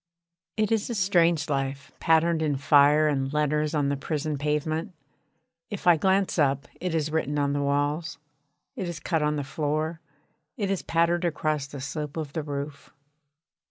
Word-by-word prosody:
It 215 -1 +1
is 225 0 +1
a 235 - -2
strange 170 -6 +3
life, 135 -1 -3
patterned 165 0 +3
in 150 -2 +1
fire 145 +2 +5
and 135 -2 0
letters 150 +1 0
on 145 -2 +1
the 140 - 0
prison 150 +1 -3
pavement. 155 +5 -1 0.8
If 205 - -6
I 175 -1 +7
glance 190 +2 +1
up 140 -1 +2
it 180 -2 -2
is 155 -1 0
written 150 -2 -1
on 140 -1 +1
the 145 - 0
walls, 145 +3 -1 0.6
it 190 -8 -3
is 170 - -5
cut 165 -3 -1
on 150 0 +1
the 145 - -2
floor, 155 +3 -2 0.6
it 200 -4 -1
is 195 - -1
patterned 170 +1 +1
across 155 -4 -1
the 140 0 -8
slope 150 +2 -5
of 150 -3 -4
the 160 - -1
roof. 145 -1 -6
150 Hz, 170 wpm, -26 LUFS, 145-170 Hz, 0.8 s, I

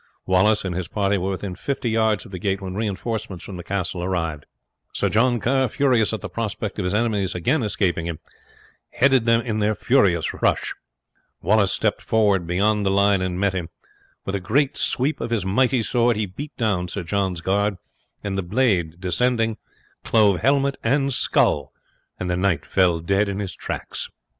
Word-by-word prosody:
Wallace 100 +3 +3
and 90 - -2
his 90 -1 -3
party 100 +1 0
were 95 +2 -2
within 95 0 -4
fifty 120 +4 -3
yards 110 -4 +1
of - - -13
the 90 - -6
gate 95 0 -1
when 95 -2 -6
reinforcements 105 -1 -3
from 95 - -7
the 90 - -7
castle 90 -1 -3
arrived. 80 -5 -2 0.5
Sir - - 0
John 120 +2 +2
Kerr, 130 +4 +2
furious 125 -3 +2
at 110 - -4
the - - -4
prospect 105 -2 -4
of 95 - -1
his 90 - -1
enemies 105 -4 0
again 125 - +1
escaping 90 -6 0
him, 85 -2 -4 0.7
headed 130 -2 +3
them 115 0 +4
in 110 -3 -2
their 105 +1 +1
furious 100 - +2
rush. - - +1 0.7
Wallace 100 +2 +3
stepped - - 0
forward 100 -6 +2
beyond 105 +4 +1
the 100 - +1
line 100 0 +3
and 90 -1 -2
met 100 -1 +1
him. 90 -3 -3 0.6
With 95 - -3
a 100 - 0
great 130 +10 +1
sweep 140 +5 0
of - - -3
his 115 -5 -1
mighty 125 +5 +2
sword 120 +1 +2
he 105 - 0
beat 140 +11 -9
down 100 -7 0
Sir 95 +2 -4
John's 95 0 -1
guard, 100 +3 +1 0.5
and 100 -2 -3
the 95 - 0
blade 90 -5 0
descending 115 +4 0 0.5
clove 105 -4 +3
helmet 140 +2 +2
and 135 +3 +1
skull, 70 - +1 0.5
and 90 - -3
the 90 - 0
knight 90 -5 0
fell 90 -3 +2
dead 100 +4 +1
in 100 - -3
his 100 -4 -4
tracks. - - -5
100 Hz, 185 wpm, -22 LUFS, 90-115 Hz, 0.7 s, them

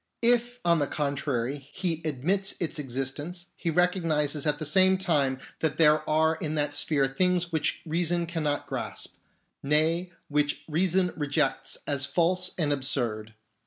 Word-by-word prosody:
If, 240 +1 +2
on 170 -1 +4
the 145 - 0
contrary, 140 -3 -2
he 165 +4 -4
admits 175 +7 -1
its 165 -3 -2
existence, 145 +6 -4
he 170 - -3
recognises 160 -4 +1
at 150 0 +2
the 155 - -5
same 190 +5 +4
time 145 -8 +1 0.2
that 155 -2 -1
there 155 -1 +4
are 160 +1 +2
in 155 -1 -3
that 145 -1 0
sphere 145 -1 +2
things 180 +5 0
which 160 -2 -1
reason 170 +1 0
cannot 155 -4 -2
grasp; - - -5 0.5
nay, 160 +5 +1 0.2
which 145 0 0
reason 180 +3 +1
rejects 145 -3 0
as 140 -1 +2
false 180 +1 +2
and 150 -4 +1
absurd. 115 -6 0
155 Hz, 145 wpm, -27 LUFS, 145-175 Hz, 0.5 s, on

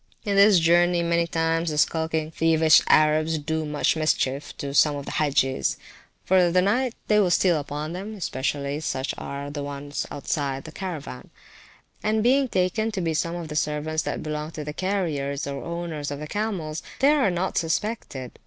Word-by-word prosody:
In 200 -1 0
this 200 0 +7
journey 175 +1 +3
many 170 0 +1
times 165 0 0
the 150 - -3
skulking, 160 0 0
thievish, 160 -1 +5
Arabs 155 +1 +4
do 160 +1 -2
much 150 +1 +1
mischief 145 -3 -1
to 140 -1 -5
some 145 +1 +4
of 140 -1 -6
the - - -5
Hagges; 135 -3 +1 0.5
for 190 - +3
in 175 -2 +3
the 180 - +5
night 245 +5 +1
time - - -39
they 210 -1 +4
will 195 -3 +3
steal 175 -2 +3
upon 150 +2 -5
them 200 +4 -6
(especially 140 -4 -2
such 135 -3 -3
as - - -10
are 140 0 -5
on 145 - -7
the 145 0 -4
outside 140 -1 -2
of 135 - -9
the 160 - -9
Caravan), 160 -9 -7 0.7
and 215 0 +1
being 265 +3 +3
taken 195 +1 0
to 200 - -2
be 165 -2 0
some 165 +2 -1
of 170 -2 -5
the 150 - -7
servants 150 +1 -1
that - - -4
belong 150 0 -4
to 155 -2 -7
the 150 0 -5
carriers, 155 -7 -2
or 140 -1 -5
owners 170 -3 -4
of 145 - -4
the 150 - -6
camels, 175 -5 -3 0.2
they 275 +3 +4
are 290 -8 +3
not 180 +1 -2
suspected. 165 - -3
160 Hz, 195 wpm, -25 LUFS, 145-180 Hz, 0.7 s, this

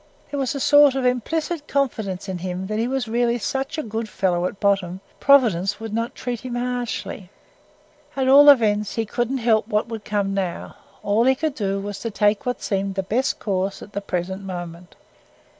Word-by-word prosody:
There 285 - -2
was 270 0 -1
a - - -2
sort 290 0 +6
of 265 -1 -1
implicit 300 +6 -1
confidence 220 -9 -2
in 185 -2 -4
him 185 +1 -4
that 215 +2 -3
he 230 - 0
was 260 -2 -2
really 235 +1 +1
such 270 +6 -3
a 310 - -2
good 225 -1 -4
fellow 180 -3 0
at 195 - -8
bottom, 195 -3 +1 0.2
Providence 210 -8 +4
would 225 -1 -6
not 230 +1 -2
treat 245 -2 -4
him 250 0 -6
harshly. 245 -6 -4 0.9
At 265 -1 0
all 285 +2 +8
events, 210 -6 +4
he 225 - -1
couldn't 240 +4 -1
help 225 -3 +2
what 210 0 0
would 225 -2 -6
come 200 -1 -1
now: 190 -3 -3 0.3
all 210 +3 +2
he 265 +1 +4
could 305 +2 -2
do 200 -6 -2
was 200 0 -5
to 230 - -3
take 210 +1 +1
what 245 - -2
seemed 195 -1 -1
the 190 - -1
best 240 +8 0
course 195 -1 -2
at 205 - -14
the 200 - -3
present 190 0 -3
moment. 175 -1 -8
220 Hz, 195 wpm, -22 LUFS, 195-250 Hz, 0.9 s, all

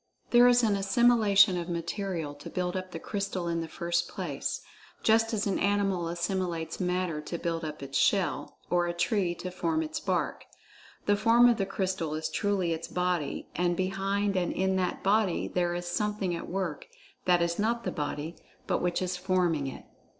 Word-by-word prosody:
There 240 0 +7
is 245 0 +5
an 210 -3 +3
"assimilation" 200 -2 +4
of 170 +1 -5
material 170 -2 -3
to 145 0 -10
build 180 -1 -2
up 185 0 -3
the 170 - -6
crystal 195 -1 -3
in 170 0 0
the 165 - -4
first 170 +1 -1
place, - - -3 0.4
just 225 +1 +4
as 215 -3 0
an 195 -2 0
animal 195 -3 +1
assimilates 170 -1 -2
matter 180 -4 -1
to 170 +3 -5
build 165 -1 -2
up 150 -2 -5
its 135 0 -1
shell—or 175 -2 +1
a 175 - -3
tree 180 -1 +1
to 180 +1 -6
form 320 - 0
its 310 0 -4
bark. - - -1 0.6
The 205 - +4
"form" 235 +3 +5
of 240 -2 +4
the 195 -3 -1
crystal 185 -5 -2
is 155 - -2
truly 195 -5 0
its 165 +1 -5
"body," 180 -5 -1
and 175 -1 +1
behind 195 +2 0
and 180 -2 +1
in 190 0 +1
that 185 -1 -1
body 200 -2 +2
there 175 -1 0
is 175 0 -4
"something 200 0 -1
at 170 - -6
work" 175 -5 -3 0.4
that 175 -1 +4
is 170 +2 -1
not 230 +2 +1
the - - -2
body, 150 +2 -4 0.3
but - - 0
which 180 +1 0
is 180 0 -2
forming 180 -6 +1
it. 135 - -8
185 Hz, 185 wpm, -29 LUFS, 170-200 Hz, 0.6 s, There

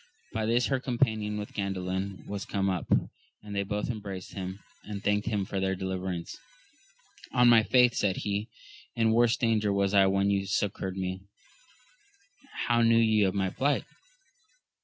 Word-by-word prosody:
By 110 -1 -1
this 120 +2 +2
her 135 -2 0
companion 110 -5 0
with 105 0 -6
Gandalin 95 0 -3
was 100 -1 -5
come 95 -1 -1
up, 90 -3 -3 0.6
and 105 -1 -7
they 100 - +1
both 105 +1 -2
embraced 100 -5 -7
him, 95 -1 -5 0.3
and 105 -1 -7
thanked 105 0 +1
him 100 -3 0
for 95 - -3
their 95 0 0
deliverance. 95 -2 -4 1.0
On 125 -1 +5
my 115 -2 +7
faith, 125 +1 +4
said 95 -4 0
he, 105 +2 -2 0.5
in 115 -1 +2
worse 120 +1 +3
danger 110 -3 +1
was 100 0 +1
I 100 -1 +6
when 100 +1 +2
you 100 -1 0
succoured 95 -2 -2
me: 95 0 -3 1.4
how 120 -1 +3
knew 115 0 +5
ye 110 -2 +4
of 95 -1 +2
my 95 -1 0
plight 140 +6 0
100 Hz, 160 wpm, -28 LUFS, 95-110 Hz, 1.4 s, my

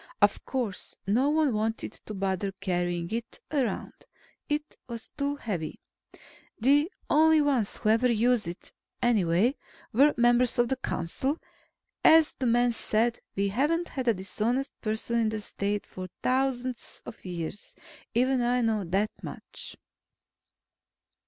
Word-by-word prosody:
Of - - +3
course, 240 -8 -3
no 240 +8 +3
one 305 -4 +3
wanted 220 +1 -1
to 215 - -5
bother 195 0 -1
carrying 175 -2 -2
it 230 +1 -4
around. 260 -9 -1 0.6
It 300 +1 -2
was 230 -1 -7
too 280 0 -1
heavy. 185 - -4 0.8
The 290 - +4 0.2
only 315 +1 +5
ones 270 -8 +1
who 215 - 0
ever 235 +3 +4
used 235 -2 +2
it, 170 +1 -7 0.3
anyway, 215 - +3 0.4
were 280 +6 +5
members 240 +1 +4
of 240 -1 +3
the 265 - +1
council. 260 - -2 0.7
As 320 -1 +7
the 260 - -2
man 240 +1 +3
said, 230 +1 +1 0.2
we 200 0 +1
haven't 300 - +1
had 260 -2 -4
a 230 - +4
dishonest 225 +8 -1
person 220 +2 0
in 225 -1 +2
the 215 0 -3
State 205 0 -2
for 185 0 -7 0.2
thousands 255 -1 -1
of - - -10
years. 175 +1 -6 0.4
Even 255 +1 +3
I 245 +1 +2
know 220 -3 +1
that 195 +5 0
much. - - -7
235 Hz, 140 wpm, -28 LUFS, 205-265 Hz, 0.8 s, As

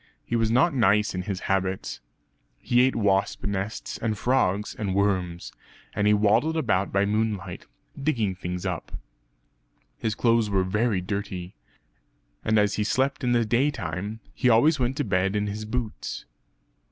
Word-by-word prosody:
He 120 - -2
was 115 -1 +2
not 155 +9 +3
nice 105 -4 +3
in 90 - -2
his 95 0 -4
habits. 95 -1 -1 0.6
He 120 0 +2
ate 130 +1 +3
wasp 100 -3 +1
nests 100 +1 -3
and 110 -2 -1
frogs 105 -4 +1
and 100 -3 -3
worms; 95 -4 0 0.4
and 105 -1 +1
he 105 - +5
waddled 110 +10 +2
about 100 -11 +1
by 100 +1 +2
moonlight, 105 -3 -2 0.3
digging 115 -10 0
things 90 -1 -5
up. - - -4 1.1
His 110 -2 -1
clothes 115 -2 +2
were 95 -2 +2
very 105 +1 0
dirty; 95 -2 -4 0.9
and 110 0 +2
as 105 -1 +2
he 105 - +1
slept 135 +5 0
in 125 -1 +2
the 120 -1 +3
day 120 +6 +2
time, 100 - -5
he 125 - +2
always 140 +7 +4
went 130 +2 0
to 145 - +1
bed 95 -2 0
in 105 0 +1
his 105 +1 -4
boots. 115 0 -4
105 Hz, 160 wpm, -26 LUFS, 95-115 Hz, 1.1 s, he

